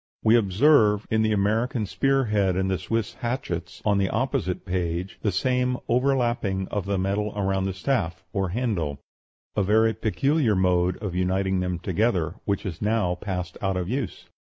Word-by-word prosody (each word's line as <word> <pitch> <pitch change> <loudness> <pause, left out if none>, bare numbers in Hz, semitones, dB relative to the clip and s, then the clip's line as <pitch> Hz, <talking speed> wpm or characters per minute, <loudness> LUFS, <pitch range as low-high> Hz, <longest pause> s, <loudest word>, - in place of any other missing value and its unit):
We 110 +1 +5
observe, 105 0 +4
in 110 0 +3
the 110 0 +2
American 110 +3 +1
spear 135 +6 +1
head 100 -4 +1
and 95 +1 0
the 95 - 0
Swiss 115 +3 -2
hatchets, 120 -8 -4
on 105 -2 +3
the 95 -1 +1
opposite 130 -9 -1
page, 90 0 -2
the 105 - +1
same 125 +4 +1
overlapping 120 -7 +1
of 100 -1 -3
the 100 -1 0
metal 100 +3 -1
around 95 -1 0
the 95 - -1
staff, 95 -6 -1
or 95 -2 0
handle 90 - -1 0.6
a 105 - +2
very 110 +3 +3
peculiar 120 +3 +1
mode 90 -1 +2
of 100 -4 -3
uniting 95 +1 0
them 90 -1 -1
together, 95 -2 0
which 100 -1 -1
has 90 -6 -5
now 105 -4 +1
passed 90 -2 -5
out 95 -2 0
of 90 -1 -2
use. 125 -5 -3
100 Hz, 170 wpm, -25 LUFS, 95-115 Hz, 0.6 s, We